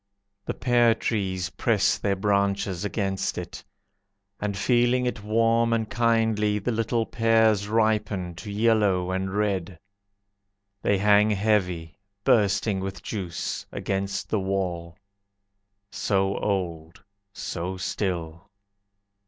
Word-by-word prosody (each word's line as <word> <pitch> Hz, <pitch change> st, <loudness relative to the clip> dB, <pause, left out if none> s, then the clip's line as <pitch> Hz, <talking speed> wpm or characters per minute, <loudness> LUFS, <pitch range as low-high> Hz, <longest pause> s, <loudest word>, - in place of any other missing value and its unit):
The -, -, -2 dB
pear 120 Hz, -2 st, +3 dB
trees 95 Hz, -6 st, -2 dB
press 100 Hz, +1 st, +1 dB
their 100 Hz, -1 st, 0 dB
branches 100 Hz, -2 st, 0 dB
against 100 Hz, -2 st, -2 dB
it, 90 Hz, 0 st, -7 dB, 0.8 s
And 105 Hz, -2 st, -2 dB
feeling 120 Hz, +3 st, +2 dB
it 120 Hz, -4 st, -3 dB
warm 115 Hz, +2 st, +2 dB
and 110 Hz, -1 st, 0 dB
kindly, 110 Hz, -3 st, +1 dB
The 105 Hz, +4 st, -2 dB
little 115 Hz, 0 st, 0 dB
pears 110 Hz, -3 st, +2 dB
ripen 105 Hz, -5 st, 0 dB
to 105 Hz, +2 st, -7 dB
yellow 100 Hz, -4 st, +2 dB
and 95 Hz, 0 st, -2 dB
red. 95 Hz, -4 st, -1 dB, 1.0 s
They 100 Hz, -, +2 dB
hang 105 Hz, +1 st, +4 dB
heavy, 95 Hz, -5 st, 0 dB, 0.2 s
bursting 105 Hz, -4 st, +2 dB
with 95 Hz, 0 st, -5 dB
juice, 90 Hz, -6 st, -4 dB
Against 100 Hz, 0 st, -3 dB
the 110 Hz, -, +1 dB
wall. 90 Hz, -3 st, -3 dB, 0.9 s
So 95 Hz, -1 st, 0 dB
old, 85 Hz, -4 st, -3 dB, 0.3 s
so 90 Hz, 0 st, -4 dB
still! 85 Hz, -1 st, -3 dB
100 Hz, 110 wpm, -25 LUFS, 95-110 Hz, 1.0 s, hang